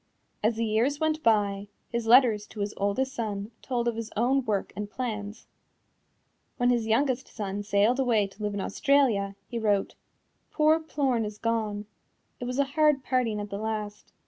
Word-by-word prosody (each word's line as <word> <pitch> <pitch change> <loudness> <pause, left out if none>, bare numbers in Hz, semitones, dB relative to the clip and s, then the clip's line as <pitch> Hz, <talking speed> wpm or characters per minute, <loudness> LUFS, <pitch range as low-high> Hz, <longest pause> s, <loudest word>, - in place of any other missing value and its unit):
As 220 +2 +2
the 230 +1 -1
years 235 +7 +1
went 315 0 0
by, 205 -4 +2 0.2
his 235 -1 -3
letters 230 -4 +5
to 210 - -7
his 205 +1 -2
oldest 230 +7 -1
son 210 -3 -4
told 240 -2 -2
of 235 - 0
his 230 -1 -5
own 260 +4 +2
work 205 -3 -1
and 205 +1 -4
plans. 215 -3 -5 1.1
When 245 -1 +3
his 235 -2 0
youngest 260 +3 +1
son 205 -2 -4
sailed 205 +5 +2
away 235 -6 +3
to 195 +2 -12
live 205 -1 -2
in 200 - -2
Australia, 225 -5 +2
he 235 - -4
wrote: 205 -3 +1 0.6
"Poor 310 +1 +4
Plorn 275 -7 0
is 210 -1 -5
gone. 215 -2 -1 0.5
It 245 - -4
was 250 +1 -3
a 280 - +4
hard 300 -3 +3
parting 240 -5 0
at 205 0 -6
the 200 - -4
last. 215 -1 -4
225 Hz, 175 wpm, -27 LUFS, 205-255 Hz, 1.1 s, letters